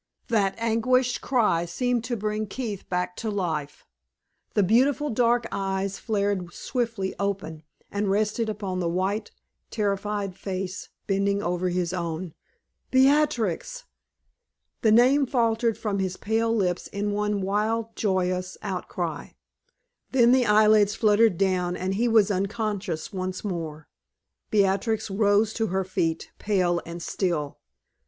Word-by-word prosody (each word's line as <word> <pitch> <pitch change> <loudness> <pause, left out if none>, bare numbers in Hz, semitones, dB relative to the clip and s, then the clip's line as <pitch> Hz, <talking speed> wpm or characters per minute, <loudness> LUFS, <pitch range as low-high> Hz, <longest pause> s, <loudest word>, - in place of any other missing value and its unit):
That 200 -4 +2
agonized 235 +3 +1
cry 210 -10 +2
seemed 245 +7 -1
to 240 -2 -2
bring 215 +1 -2
Keith 210 -3 -5
back 180 0 -1
to 225 - -3
life. 160 -8 -3 0.7
The 205 - +4
beautiful 265 +8 +3
dark 240 +1 +2
eyes 195 0 -2
flared 200 -5 -1
swiftly 230 -6 -2
open, 195 -6 -3 0.3
and 205 0 -1
rested 215 +3 +1
upon 195 -3 -3
the 170 -2 0
white, 190 +5 -1 0.4
terrified 205 -2 -2
face 190 0 -5 0.2
bending 200 0 +1
over 180 +1 0
his 175 0 -1
own. 170 -1 -4 0.6
"Beatrix!" 275 - +2 1.0
The 220 - +4
name 260 +5 +5
faltered 230 -2 +1
from 205 -3 -2
his 185 -1 -2
pale 225 +2 0
lips 185 -6 0
in 205 +1 -2
one 210 0 0
wild, 215 +3 -1
joyous 185 -2 -1
outcry; 180 -5 -4 0.8
then 240 -2 +5
the 255 -1 +4
eyelids 210 -1 +5
fluttered 215 -3 +4
down 180 -2 +1
and 185 +1 -2
he 230 +5 +1
was 220 -3 +4
unconscious 200 -3 -2
once 185 -1 -4
more. 160 -6 -5 0.6
Beatrix 205 +1 +1
rose 205 +1 +3
to 225 -1 -1
her 190 0 0
feet, 165 -3 -2
pale 180 -4 +1
and 170 0 -6
still. 165 -7 -2
200 Hz, 130 wpm, -26 LUFS, 185-225 Hz, 1.0 s, name